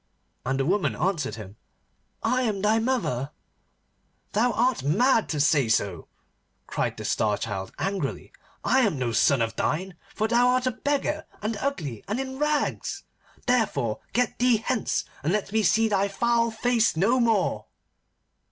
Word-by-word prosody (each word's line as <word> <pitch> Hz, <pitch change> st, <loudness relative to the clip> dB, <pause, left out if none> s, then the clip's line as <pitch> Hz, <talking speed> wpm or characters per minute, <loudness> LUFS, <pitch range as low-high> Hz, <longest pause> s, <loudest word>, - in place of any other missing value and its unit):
And 135 Hz, +1 st, 0 dB
the 135 Hz, -, +1 dB
woman 190 Hz, +4 st, +1 dB
answered 170 Hz, -9 st, -1 dB
him, 105 Hz, -2 st, -10 dB, 0.7 s
'I 255 Hz, 0 st, +2 dB
am 215 Hz, -6 st, -1 dB
thy 215 Hz, +2 st, +3 dB
mother.' 225 Hz, -, -1 dB, 1.0 s
'Thou 240 Hz, +4 st, +3 dB
art 245 Hz, +2 st, +1 dB
mad 220 Hz, -, +2 dB
to 150 Hz, -, -2 dB
say 140 Hz, -4 st, +3 dB
so,' 95 Hz, -6 st, 0 dB, 0.6 s
cried -, -, -2 dB
the -, -, -6 dB
Star 105 Hz, -2 st, +1 dB
Child 95 Hz, -3 st, -4 dB
angrily. 195 Hz, 0 st, -3 dB, 0.3 s
'I 265 Hz, -, +3 dB
am 210 Hz, -, +2 dB
no 125 Hz, -2 st, -1 dB
son 115 Hz, +2 st, +3 dB
of 115 Hz, 0 st, -3 dB
thine, 185 Hz, +10 st, -1 dB, 0.2 s
for 215 Hz, -, +1 dB
thou 240 Hz, +2 st, +4 dB
art 255 Hz, 0 st, +2 dB
a 255 Hz, -, +2 dB
beggar, 290 Hz, +4 st, -2 dB, 0.2 s
and 215 Hz, +1 st, -1 dB
ugly, 155 Hz, -, -3 dB
and 215 Hz, +6 st, -2 dB
in 265 Hz, 0 st, -5 dB
rags. 300 Hz, +6 st, -1 dB, 0.4 s
Therefore 195 Hz, -, +1 dB
get 250 Hz, +1 st, 0 dB
thee 245 Hz, -1 st, +4 dB
hence, 225 Hz, +1 st, -1 dB, 0.2 s
and 155 Hz, -, +1 dB
let 205 Hz, 0 st, -1 dB
me 220 Hz, +1 st, +2 dB
see 225 Hz, +3 st, +3 dB
thy 200 Hz, -2 st, +1 dB
foul 235 Hz, +3 st, +1 dB
face 230 Hz, -3 st, +1 dB
no 230 Hz, +9 st, +3 dB
more. 225 Hz, -5 st, +1 dB
215 Hz, 160 wpm, -26 LUFS, -, 1.0 s, thou